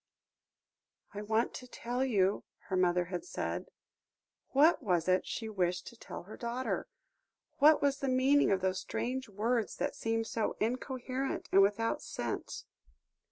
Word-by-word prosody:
"I 205 - -5
want 220 +3 +1
to 250 - -8
tell 245 +1 -2
you," 200 -6 +2 0.3
her 190 - 0
mother 180 -1 +3
had 180 - -2
said. - - -4 0.8
What 310 +5 +5
was 180 -8 +1
it 185 0 +2
she 225 - -4
wished 180 -4 -1
to - - -16
tell - - -8
her 205 +5 -10
daughter? 240 +2 -3 0.7
What 295 +1 +6
was 280 0 +2
the 275 - -1
meaning 265 +3 +4
of 195 -1 +2
those 185 0 0
strange 255 -1 -3
words 220 +3 0
that - - -2
seemed 225 0 -1
so 225 -1 -2
incoherent 255 +3 -2
and 195 - +7
without 210 +3 +2
sense? - - -4
225 Hz, 150 wpm, -32 LUFS, 195-255 Hz, 0.8 s, and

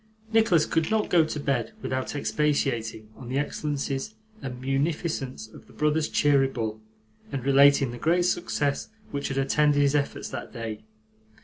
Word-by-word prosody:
Nicholas 205 -8 +4
could 160 -1 0
not 220 -1 0
go 170 -2 +6
to 155 -1 -4
bed 140 - -1
without 130 +2 -2
expatiating 135 -7 -1
on 125 -2 -10
the 130 - -1
excellences 145 +5 -2 0.3
and 125 -1 -6
munificence 135 -2 -2
of - - -15
the - - -18
brothers 150 +1 +1
Cheeryble, 135 -7 +1 0.5
and 135 -3 -4
relating 140 -1 +5
the 120 - -8
great 175 +5 +2
success 145 -5 -1 0.2
which 140 - -2
had 135 - -3
attended 145 +2 +3
his 140 -1 +3
efforts 145 -1 -1
that - - -6
day. 115 -3 -6
140 Hz, 150 wpm, -26 LUFS, 130-150 Hz, 0.5 s, go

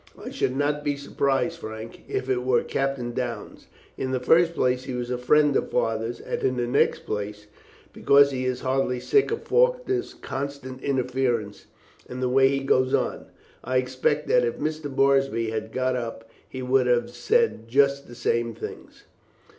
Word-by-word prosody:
"I - - -8
should 130 - -1
not 145 +1 0
be 145 -1 0
surprised, 140 +3 -1
Frank, 110 -3 -8
if 130 - -3
it 125 -1 0
were 125 -1 +2
Captain 135 -3 -2
Downes. 120 -3 -5 0.3
In 130 - -2
the 130 -1 0
first 165 +6 +3
place, 125 0 +1
he 130 - -4
was 125 0 -4
a 125 - -1
friend 145 +3 +3
of - - 0
Father's, 115 0 -1
and - - -4
in 130 -1 0
the 120 - 0
next 125 +3 +1
place, 105 0 -4 0.5
because 140 0 +5
he 130 -1 -3
is 130 -1 -2
heartily 130 -1 0
sick 415 - +2
of 450 - -3
Faulkner's - - +1
constant 135 -1 -6
interference 125 -5 -1 0.4
and 125 - -6
the 130 -1 0
way 135 +1 +5
he 135 0 0
goes 130 -1 +2
on. - - -2 0.4
I 130 0 0
expect 130 0 0
that - - +4
if 465 - -1
Mr. 155 0 -3
Moorsby 135 -4 +2
had 110 0 -4
got 130 0 0
up 115 -2 -5 0.2
he 130 -1 -6
would 130 0 +2
have 120 -1 +1
said 450 - +1
just 140 +2 +2
the 120 - -11
same 115 -1 -1
things." - - -9
130 Hz, 180 wpm, -25 LUFS, 120-140 Hz, 0.5 s, because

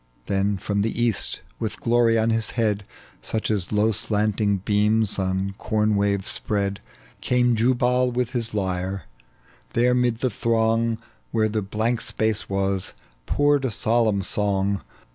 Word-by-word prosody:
Then 100 +1 0
from 100 +1 -1
the 110 +2 -2
east, 120 -3 +3 0.2
witli 110 -2 -2
glory 115 -1 +3
on 110 +1 +2
his 110 -1 +1
head 105 -3 0 0.4
Such 110 0 -2
as 100 -4 0
low 105 +1 +2
slanting 105 -1 0
beams 105 +2 +1
on 95 +1 -1
corn 105 -1 +1
waves 100 -1 0
spread, 100 -2 -1 0.4
Came 125 -1 +2
Jubal 125 +2 +2
with 125 0 -1
his 115 -4 -2
lyre: 95 -2 -2 0.7
there 125 +1 +3
'mid 125 -2 +1
the 130 - +1
throng, 115 +1 +1 0.3
Where 110 -1 +1
the 105 0 -1
blank 110 +4 -1
space 110 -1 -1
was, 95 -1 0 0.3
poured 145 -1 +2
a 130 - +1
solemn 110 -2 +1
song. 100 0 -1
110 Hz, 145 wpm, -23 LUFS, 100-115 Hz, 0.7 s, east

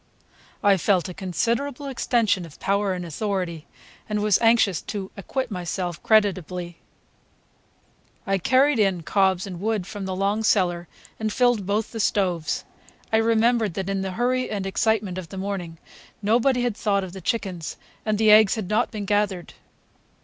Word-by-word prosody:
I 200 -1 +5
felt 185 0 +1
a - - -6
considerable 235 - -2
extension 235 -7 +1
of 165 -4 -12
power 200 0 +1
and 180 -1 -5
authority, 175 -2 -3 0.4
and 210 0 0
was 210 -2 +3
anxious 225 -6 +4
to 195 -3 -6
acquit 250 +5 -4
myself 180 -2 -3
creditably. 180 -5 +1 1.5
I 195 -2 +1
carried 260 - +3
in 190 -5 +2
cobs 190 0 +2
and 180 -3 -7
wood 215 -3 -1
from 200 0 -6
the 190 -1 -3
long 200 +3 0
cellar, 175 -5 +1 0.3
and 215 -1 -1
filled 245 -5 +2
both 210 +2 -1
the 225 - -6
stoves. 180 -6 0 0.5
I - - +6
remembered 225 -3 +2
that 195 0 -3
in 195 -1 -1
the 190 -1 -3
hurry 250 +4 0
and 200 -2 -3
excitement 195 -2 0
of 170 -3 -9
the 195 - -8
morning 190 -4 -4 0.5
nobody 245 +4 +2
had 240 -4 0
thought 200 -2 0
of 180 -2 -7
the 190 - -8
chickens, 185 -6 -3 0.3
and 215 -1 0
the 215 0 +5
eggs 215 0 +7
had 210 -5 -4
not 220 +3 +2
been 210 -2 -5
gathered. 205 -3 -1
200 Hz, 165 wpm, -24 LUFS, 185-220 Hz, 1.5 s, eggs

